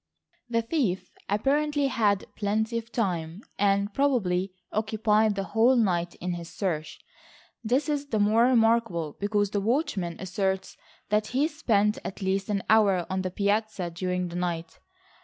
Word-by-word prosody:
The 230 Hz, -1 st, +1 dB
thief 230 Hz, -, -1 dB, 0.2 s
apparently 285 Hz, +7 st, +1 dB
had 215 Hz, -7 st, +1 dB
plenty 220 Hz, +3 st, 0 dB
of 230 Hz, 0 st, -13 dB
time, 180 Hz, -4 st, -2 dB, 0.2 s
and 200 Hz, +1 st, +2 dB
probably 195 Hz, -10 st, +1 dB, 0.2 s
occupied 215 Hz, 0 st, +2 dB
the 195 Hz, -, -2 dB
whole 225 Hz, +6 st, +3 dB
night 175 Hz, -7 st, +1 dB
in 180 Hz, 0 st, -3 dB
his 170 Hz, -1 st, -7 dB
search. 165 Hz, -6 st, -3 dB, 0.6 s
This 250 Hz, +7 st, +1 dB
is 290 Hz, -1 st, -1 dB
the 225 Hz, -, -1 dB
more 215 Hz, +3 st, +4 dB
remarkable 225 Hz, -, +2 dB
because 205 Hz, 0 st, 0 dB
the 205 Hz, -, 0 dB
watchman 200 Hz, -, -1 dB
asserts 190 Hz, +1 st, -2 dB, 0.3 s
that 210 Hz, +1 st, +1 dB
he 270 Hz, +6 st, +1 dB
spent 220 Hz, -9 st, +1 dB
at -, -, -6 dB
least 195 Hz, +1 st, -1 dB
an 200 Hz, -2 st, 0 dB
hour 200 Hz, -5 st, +4 dB
on 190 Hz, 0 st, 0 dB
the 185 Hz, -, -2 dB
piazza 200 Hz, -1 st, -1 dB
during 180 Hz, +1 st, -2 dB
the 170 Hz, -, -8 dB
night. 175 Hz, -2 st, -3 dB
205 Hz, 150 wpm, -27 LUFS, 185-230 Hz, 0.6 s, more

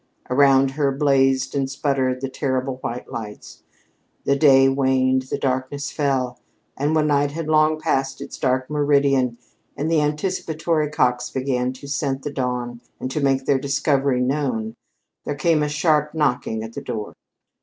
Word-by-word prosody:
Around 135 Hz, 0 st, +4 dB
her 140 Hz, 0 st, 0 dB
blazed 135 Hz, -2 st, +2 dB
and 135 Hz, -2 st, -1 dB
sputtered 135 Hz, -2 st, -1 dB
the 135 Hz, -, -2 dB
terrible 130 Hz, 0 st, -2 dB
white 125 Hz, -1 st, -6 dB
lights. 105 Hz, -2 st, -8 dB, 0.6 s
The 140 Hz, -, +3 dB
day 135 Hz, -2 st, +6 dB
waned; 130 Hz, -1 st, +2 dB
the -, -, -1 dB
darkness 130 Hz, +2 st, -2 dB
fell; 130 Hz, -4 st, -1 dB, 0.4 s
and 145 Hz, +3 st, 0 dB
when 155 Hz, -1 st, +3 dB
night 145 Hz, -1 st, +2 dB
had 165 Hz, 0 st, -4 dB
long 155 Hz, 0 st, +3 dB
passed 135 Hz, -4 st, -1 dB
its 140 Hz, 0 st, -8 dB
dark 130 Hz, -1 st, 0 dB
meridian 140 Hz, -4 st, +2 dB, 0.4 s
and 155 Hz, +3 st, -1 dB
the 160 Hz, -2 st, +3 dB
anticipatory 155 Hz, 0 st, -1 dB
cocks 125 Hz, -4 st, +1 dB
began 130 Hz, -1 st, -1 dB
to 130 Hz, +2 st, -11 dB
scent 140 Hz, -2 st, -2 dB
the 145 Hz, -, -4 dB
dawn 125 Hz, -2 st, -3 dB, 0.2 s
and 130 Hz, -, -4 dB
to 150 Hz, -, -2 dB
make 135 Hz, -1 st, +1 dB
their 135 Hz, -1 st, +2 dB
discovery 140 Hz, -1 st, +1 dB
known, 125 Hz, -5 st, -1 dB, 0.5 s
there 145 Hz, -, -3 dB
came 160 Hz, +1 st, +2 dB
a 150 Hz, -, 0 dB
sharp 150 Hz, 0 st, +1 dB
knocking 125 Hz, -7 st, 0 dB
at 110 Hz, +1 st, -8 dB
the -, -, -6 dB
door. 110 Hz, -4 st, -5 dB
135 Hz, 160 wpm, -22 LUFS, 130-150 Hz, 0.6 s, day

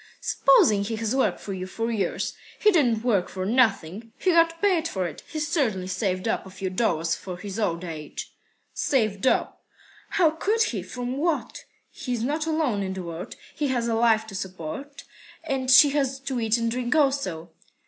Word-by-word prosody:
"Supposing 215 Hz, -7 st, +4 dB
he 225 Hz, +3 st, -3 dB
has 225 Hz, +2 st, -2 dB
worked 270 Hz, -, +1 dB
for 200 Hz, -, -6 dB
you 185 Hz, 0 st, -5 dB
for 225 Hz, +4 st, -3 dB
years. 200 Hz, -6 st, -1 dB, 0.2 s
He 425 Hz, -, +4 dB
didn't 245 Hz, -, +2 dB
work 205 Hz, -7 st, +1 dB
for 185 Hz, -1 st, -4 dB
nothing. 220 Hz, -2 st, +1 dB
He 370 Hz, -, +2 dB
got 330 Hz, -1 st, +3 dB
paid 360 Hz, -5 st, +2 dB
for 190 Hz, -, -2 dB
it. 160 Hz, -4 st, -6 dB
He's 305 Hz, -1 st, -3 dB
certainly 235 Hz, -, 0 dB
saved 185 Hz, 0 st, -2 dB
up -, -, 0 dB
a 190 Hz, -, -11 dB
few 190 Hz, 0 st, -5 dB
dollars 170 Hz, -5 st, +1 dB
for 180 Hz, 0 st, -6 dB
his 200 Hz, +3 st, -6 dB
old 170 Hz, -5 st, -1 dB
age." 155 Hz, -4 st, -7 dB, 0.4 s
"Saved 215 Hz, -4 st, 0 dB
up! -, -, 0 dB, 0.5 s
How 335 Hz, -5 st, +3 dB
could 425 Hz, +8 st, +1 dB
he? 225 Hz, -, -2 dB
From 245 Hz, +7 st, -5 dB
what? 320 Hz, +1 st, -2 dB, 0.3 s
He's 245 Hz, -4 st, -3 dB
not 305 Hz, +5 st, -1 dB
alone 305 Hz, -10 st, 0 dB
in 190 Hz, -1 st, -3 dB
the 190 Hz, -1 st, -5 dB
world. 170 Hz, +1 st, -7 dB, 0.2 s
He 295 Hz, -, -1 dB
has 245 Hz, -3 st, 0 dB
a 230 Hz, -, +1 dB
wife 225 Hz, -1 st, +3 dB
to 220 Hz, -, -11 dB
support, 190 Hz, -, -6 dB, 0.4 s
and 270 Hz, -5 st, -2 dB
she 270 Hz, +2 st, +8 dB
has 270 Hz, -2 st, 0 dB
to 270 Hz, -2 st, -3 dB
eat 225 Hz, 0 st, +2 dB
and 230 Hz, 0 st, -1 dB
drink 245 Hz, +3 st, -1 dB
also." 265 Hz, -, 0 dB
230 Hz, 190 wpm, -25 LUFS, 190-275 Hz, 0.5 s, she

